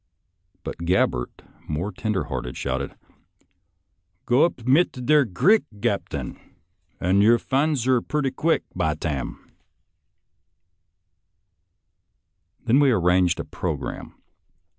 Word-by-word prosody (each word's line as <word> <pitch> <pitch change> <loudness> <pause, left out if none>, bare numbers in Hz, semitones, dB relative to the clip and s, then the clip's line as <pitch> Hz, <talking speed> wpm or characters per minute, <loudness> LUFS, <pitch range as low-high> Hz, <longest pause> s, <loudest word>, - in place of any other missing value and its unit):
But - - -6
Gabbert, 85 -8 0 0.3
more 80 +7 -2
tender 100 -2 -2
hearted, 65 -4 -5
shouted: 70 0 -3 0.7
" - - -49
Go 125 +6 +4
up 130 -9 -4
mit 140 +8 +4
der 150 0 +5
grick, 180 - +3 0.2
Gaptain, - - -3 0.6
und 95 +3 +2
yer 115 +3 +6
fin's 140 +2 0
her 130 -1 +2
purty 145 -1 -1
quick, 160 +5 +1
by - - 0
tarn! 70 -5 -3 2.4
" 85 - -47
Then 120 +4 +4
we 145 -2 +5
arranged 90 -5 +2
a - - -4
programme. - - -5
110 Hz, 110 wpm, -24 LUFS, 85-135 Hz, 2.4 s, yer